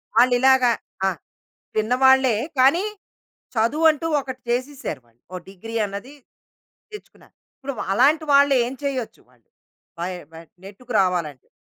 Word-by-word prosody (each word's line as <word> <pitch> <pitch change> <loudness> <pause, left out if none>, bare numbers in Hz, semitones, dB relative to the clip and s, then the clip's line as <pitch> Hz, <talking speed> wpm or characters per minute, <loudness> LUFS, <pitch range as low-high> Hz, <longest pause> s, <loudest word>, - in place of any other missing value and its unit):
వాళ్ళు 250 0 +5
ఇలాగ 265 0 +4 0.4
ఆ! - - +3 0.7
చిన్నవాళ్లే 255 +2 +4 0.2
కానీ 290 +10 +4 0.7
చదువంటూ 300 +8 +2
ఒకటి 260 -1 -8
చేసేశారు 255 - -3
వాళ్ళు 115 +1 -33
ఓ - - -3
డిగ్రీ 225 +4 -8
అన్నది 200 +8 -8 0.8
తెచ్చుకున్నారు. 420 - -14 0.2
ఇప్పుడు‌వా 270 -3 -6
అలాంటి 295 +8 +3
వాళ్ళు 280 0 +5
ఏం 245 - -4
చేయొచ్చు? 260 -5 -4
వాళ్ళు 120 -3 -31 0.5
వై 175 +2 -2 0.2
వ - - -17 0.3
నెట్టుకు 220 +6 -10
రావాలంటే? 170 -8 -2
255 Hz, 120 wpm, -22 LUFS, 200-275 Hz, 0.8 s, వాళ్ళు